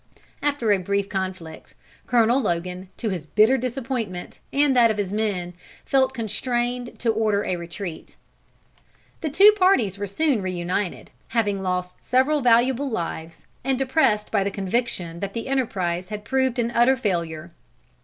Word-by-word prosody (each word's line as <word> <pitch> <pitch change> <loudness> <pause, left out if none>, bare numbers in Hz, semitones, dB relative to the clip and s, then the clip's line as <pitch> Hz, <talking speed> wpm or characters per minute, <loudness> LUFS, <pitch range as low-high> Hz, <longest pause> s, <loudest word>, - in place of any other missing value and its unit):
After 285 -7 +1
a 200 - +4
brief 200 +2 -1
conflict, 185 -4 -5 0.3
Colonel 240 +2 +3
Logan, 180 -2 -3
to 225 - -2
his 175 -6 -4
bitter 215 - +4
disappointment 245 -7 -4
and 285 -1 +3
that 235 -2 +6
of 215 - -1
his 200 -2 -2
men, 200 -5 -2 0.3
felt 265 -1 +3
constrained 240 +2 -2
to 230 - +1
order 215 -2 +1
a 185 - 0
retreat. 170 0 -7 1.1
The 315 - -1
two 400 +9 +7
parties 365 - +2
were 205 - -2
soon 270 +2 +1
reunited, 185 +1 -3 0.2
having 205 -4 0
lost 180 -1 -2
several 265 +4 +2
valuable 250 +3 +3
lives, 165 -6 -5 0.2
and 265 0 0
depressed 260 -6 +1
by 200 -3 +2
the 200 - -1
conviction 195 -4 -2
that 200 +1 -4
the 230 - -4
enterprise 185 -10 -1
had 210 0 -6
proved 260 +1 +1
an 235 -1 0
utter 240 +3 +4
failure. 170 -7 -2
215 Hz, 150 wpm, -23 LUFS, 185-255 Hz, 1.1 s, two